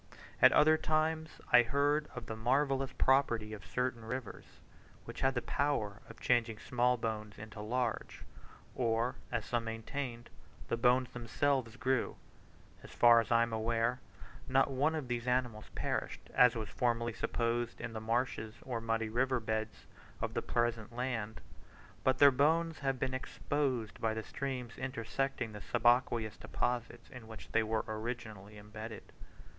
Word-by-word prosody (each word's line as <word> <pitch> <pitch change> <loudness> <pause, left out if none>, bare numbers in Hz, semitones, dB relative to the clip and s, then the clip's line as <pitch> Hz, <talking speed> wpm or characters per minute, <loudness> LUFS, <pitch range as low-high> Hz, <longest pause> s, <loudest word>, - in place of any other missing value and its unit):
At - - +9
other 155 +1 +6
times 160 0 +1 0.2
I 120 - +10
heard 145 +5 +1
of 125 -2 -6
the 110 - -5
marvellous 135 +3 +1
property 120 -5 +2
of 105 -3 -8
certain 120 +7 -2
rivers, 125 0 -5 0.6
which - - -8
had 135 0 +2
the 125 - -1
power 115 -8 -1
of - - -12
changing 120 -3 +2
small 125 +2 +1
bones 110 -2 -4
into 105 0 -8
large; 120 +2 -2 0.5
or, 115 0 0
as - - -1
some 120 -1 -1
maintained, 120 +2 -5 0.4
the - - +2
bones 125 +1 +3
themselves 125 0 0
grew. 130 -1 0 0.7
As - - -12
far 120 -1 +6
as 115 - -7
I 115 0 +5
am 115 -1 -3
aware, 115 +2 0 0.5
not 135 +1 +3
one 145 +5 +1
of 150 -5 -3
these 120 0 -3
animals 125 -4 0
perished, - - -3
as 125 -2 +6
was 110 -2 -4
formerly 120 -1 0
supposed, 115 +1 -1
in 120 -1 -5
the 110 - -5
marshes 110 -1 -1
or 120 -3 -3
muddy 115 0 0
river 125 +3 +1
beds 110 -1 -3 0.3
of - - -2
the - - -1
present 120 -2 -1
land, 120 -4 -3 0.6
but 130 0 +3
their 140 +1 +8
bones 160 +5 +2
have 135 -2 0
been 130 +1 -2
exposed 130 -3 -2
by 110 -1 +1
the 110 - -3
streams 125 -1 -5
intersecting 130 -1 -2
the 105 -1 -8
subaqueous 120 -1 +2
deposit 120 -1 -2
in 125 -4 -10
which 110 -1 -11
they 115 - +3
were 110 0 0
originally 110 -2 -5
embedded. 110 +1 -9
120 Hz, 155 wpm, -33 LUFS, 110-130 Hz, 0.7 s, I